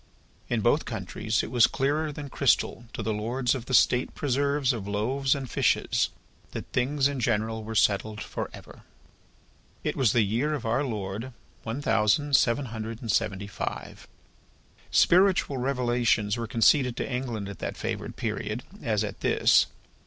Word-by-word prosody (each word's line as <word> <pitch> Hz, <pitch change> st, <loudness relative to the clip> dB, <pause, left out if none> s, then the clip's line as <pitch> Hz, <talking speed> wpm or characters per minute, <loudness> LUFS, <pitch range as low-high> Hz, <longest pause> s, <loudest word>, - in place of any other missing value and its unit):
In -, -, 0 dB
both -, -, +2 dB
countries 110 Hz, 0 st, -2 dB
it -, -, -6 dB
was 120 Hz, -2 st, +6 dB
clearer 150 Hz, +3 st, 0 dB
than 145 Hz, 0 st, -7 dB
crystal 120 Hz, -2 st, +1 dB
to 110 Hz, -, -4 dB
the 110 Hz, +1 st, -1 dB
lords 120 Hz, +4 st, 0 dB
of 125 Hz, -3 st, -5 dB
the 130 Hz, -, -4 dB
State 125 Hz, +1 st, +3 dB
preserves 140 Hz, 0 st, +1 dB
of 105 Hz, -4 st, -5 dB
loaves 130 Hz, +7 st, 0 dB
and 135 Hz, -2 st, -5 dB
fishes, -, -, +1 dB, 0.4 s
that -, -, -5 dB
things 135 Hz, +2 st, +2 dB
in 140 Hz, -2 st, -3 dB
general 110 Hz, -1 st, 0 dB
were 110 Hz, +1 st, -6 dB
settled 105 Hz, +1 st, +2 dB
for -, -, -5 dB
ever. -, -, -13 dB, 1.0 s
It -, -, -1 dB
was 125 Hz, -6 st, +3 dB
the 120 Hz, -, +3 dB
year 120 Hz, +10 st, 0 dB
of 135 Hz, -, -6 dB
Our 120 Hz, +5 st, +1 dB
Lord 110 Hz, 0 st, -4 dB, 0.3 s
one 115 Hz, +6 st, -5 dB
thousand 135 Hz, +7 st, +2 dB
seven 130 Hz, +3 st, +3 dB
hundred 110 Hz, 0 st, -5 dB
and 115 Hz, -4 st, -2 dB
seventy 100 Hz, -3 st, 0 dB
five. 100 Hz, -, -6 dB, 0.8 s
Spiritual 180 Hz, -6 st, +4 dB
revelations 120 Hz, -5 st, +1 dB
were 115 Hz, -1 st, -4 dB
conceded 125 Hz, +2 st, +3 dB
to -, -, -2 dB
England 125 Hz, -6 st, -3 dB
at 100 Hz, -3 st, -8 dB
that -, -, -4 dB
favoured -, -, -4 dB
period, 110 Hz, +1 st, -3 dB, 0.2 s
as 110 Hz, -3 st, 0 dB
at 105 Hz, -1 st, -5 dB
this. -, -, +4 dB
120 Hz, 160 wpm, -27 LUFS, 110-135 Hz, 1.0 s, was